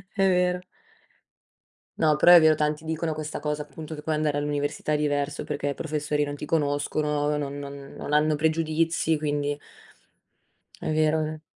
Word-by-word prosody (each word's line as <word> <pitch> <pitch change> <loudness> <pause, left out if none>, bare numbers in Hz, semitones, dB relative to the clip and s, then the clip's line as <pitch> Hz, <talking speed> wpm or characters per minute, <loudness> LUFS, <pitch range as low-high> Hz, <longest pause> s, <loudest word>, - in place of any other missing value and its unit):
è 195 -1 +3
vero. 180 -1 +2 1.4
No 155 -2 +4
però 175 +4 +7
è 175 - +11
vero, 155 -1 +6
tanti 150 +1 -1
dicono 160 0 -2
questa 155 0 -5
cosa, 150 0 -2
appunto 155 +1 -9
che 150 - -9
poi 155 - -1
andare 150 -1 0
all'università 145 +1 -2
è 150 - +3
diverso, 145 -1 -1
perché 145 -1 -3
i - - -1
professori 150 -1 -1
non 145 0 -4
ti 150 - -6
conoscono, 150 0 0
non 140 -1 -4
non 140 -1 -8
non 150 - -5
hanno 150 0 +3
pregiudizi, 160 +1 +1
quindi 145 -1 -1 1.2
È - - -2
vero, 155 0 +2
è - - 0
ve 155 0 -5
150 Hz, 170 wpm, -26 LUFS, 145-155 Hz, 1.4 s, è